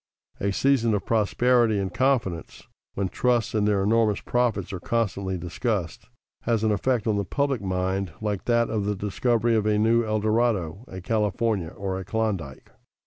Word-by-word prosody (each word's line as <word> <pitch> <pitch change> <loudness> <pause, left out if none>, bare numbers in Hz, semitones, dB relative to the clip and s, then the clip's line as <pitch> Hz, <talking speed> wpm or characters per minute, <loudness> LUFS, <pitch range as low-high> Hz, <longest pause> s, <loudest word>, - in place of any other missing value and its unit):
A 100 - 0
season 115 -1 +2
of 100 - -3
prosperity 115 +1 +2
and 95 -2 -2
confidence, 115 - -1 0.3
when 100 -1 0
trusts 120 +4 0
and 105 -1 +1
their 100 -2 +2
enormous 110 0 +2
profits 120 -6 -1
are 95 - -4
constantly 100 -3 -1
discussed, 90 +2 -3 0.3
has 115 -2 0
an 110 - +2
effect 115 +2 0
on 110 -3 +1
the 100 - 0
public 140 +4 -1
mind 95 -1 -1
like 105 -3 -3
that 120 -1 +2
of 105 -3 -1
the 105 0 0
discovery 115 +4 0
of 110 -1 +1
a 105 -1 +2
new 115 +2 +3
El 110 -1 0
Dorado, 110 -3 0
a 95 0 -8
California, 105 -2 0
or 95 0 -4
a - - -5
Klondike. 95 -10 -3
105 Hz, 170 wpm, -25 LUFS, 95-115 Hz, 0.3 s, new